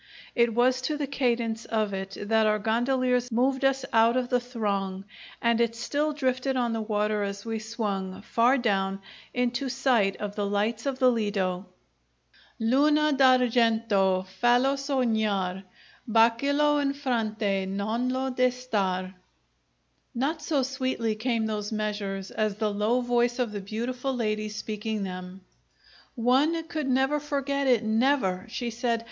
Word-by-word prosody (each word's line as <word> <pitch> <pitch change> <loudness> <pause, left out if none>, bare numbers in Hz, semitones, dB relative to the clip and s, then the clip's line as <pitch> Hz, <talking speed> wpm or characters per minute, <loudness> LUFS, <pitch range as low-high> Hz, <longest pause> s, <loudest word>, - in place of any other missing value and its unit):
It 235 -1 +2
was 255 +1 +3
to 300 +4 -2
the 290 - -1
cadence 235 -4 -1
of 215 -3 -1
it 195 0 -5
that 220 +1 +2
our 215 0 +3
gondoliers 245 +3 0
moved 265 +4 +1
us 270 0 +2
out 230 +2 +4
of 250 -1 -1
the 250 - +2
throng, 200 -6 -3 0.4
and 235 0 +3
it 230 -1 +1
still 295 +6 -1
drifted 260 -2 -1
on 240 -2 0
the 225 - -2
water 210 -1 0
as 200 0 -4
we 225 -1 -3
swung, 200 -4 -4
far 240 +4 +3
down, 195 -5 0 0.3
into 250 +2 -1
sight 240 -6 +2
of 205 -1 -5
the 205 -1 -1
lights 215 +5 -1
of 270 -2 -1
the 255 -1 +4
Ledo: 200 -5 -1 0.9
"Luna 295 +6 +3
d'ar 255 -2 +5
gen 230 -1 +2
to 190 -2 +2
fal 240 +7 +2
lo 270 +1 +2
so 275 -1 -1
gnar 200 -5 0 0.4
Ba 230 +1 +5
cia 280 +2 0
lo 295 0 +3
in 280 -1 0
fron 240 -6 -1
te 195 -3 -1
non 215 +6 -1
lo 260 +1 -1
de 255 0 +3
star...." 195 -7 -2 1.0
Not 295 +6 -1
so 300 -3 0
sweetly 260 -4 -1
came 225 0 -1
those 210 -1 -3
measures 205 -3 -3
as 215 -2 -1
the 215 -1 -1
low 215 +5 +1
voice 240 0 +1
of 245 -4 -1
the 205 -1 -5
beautiful 245 +6 -3
lady 215 -2 -1
speaking 215 0 -4
them. 185 0 -7 0.7
"One 275 +7 +2
could 305 -5 -3
never 265 +3 +2
forget 280 -1 -2
it, 245 -3 +3
never!" 220 -4 +1
she 235 +1 -4
said. 235 0 -1
230 Hz, 160 wpm, -27 LUFS, 210-255 Hz, 1.0 s, d'ar